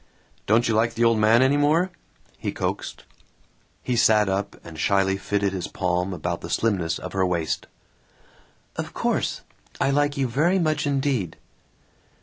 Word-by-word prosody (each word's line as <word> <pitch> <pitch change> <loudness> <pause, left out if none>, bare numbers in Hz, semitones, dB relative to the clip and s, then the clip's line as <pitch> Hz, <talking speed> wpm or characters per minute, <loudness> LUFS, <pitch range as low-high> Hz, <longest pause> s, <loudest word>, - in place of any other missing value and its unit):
"Don't 115 +3 +3
you 115 - +1
like 115 +1 +1
the 115 - +1
old 115 -1 +4
man 110 +3 +5
any 135 +2 +3
more?" 160 +6 +2 0.5
he - - -2
coaxed. - - -4 0.8
He 125 - -1
sat 105 -3 +4
up 100 +1 -2
and 80 -2 -10
shyly 95 +2 +2
fitted 100 0 -1
his 95 -2 -3
palm 90 0 -1
about 85 -1 -3
the - - -7
slimness 90 -7 0
of 90 - -8
her 95 -1 +1
waist. 85 -3 -1 1.1
"Of - - -5
course. - - -1 0.4
I 135 - +2
like 145 +1 +1
you 135 -1 +1
very 155 +10 +2
much 155 -4 0
indeed." 135 - -1
110 Hz, 155 wpm, -24 LUFS, 95-135 Hz, 1.1 s, man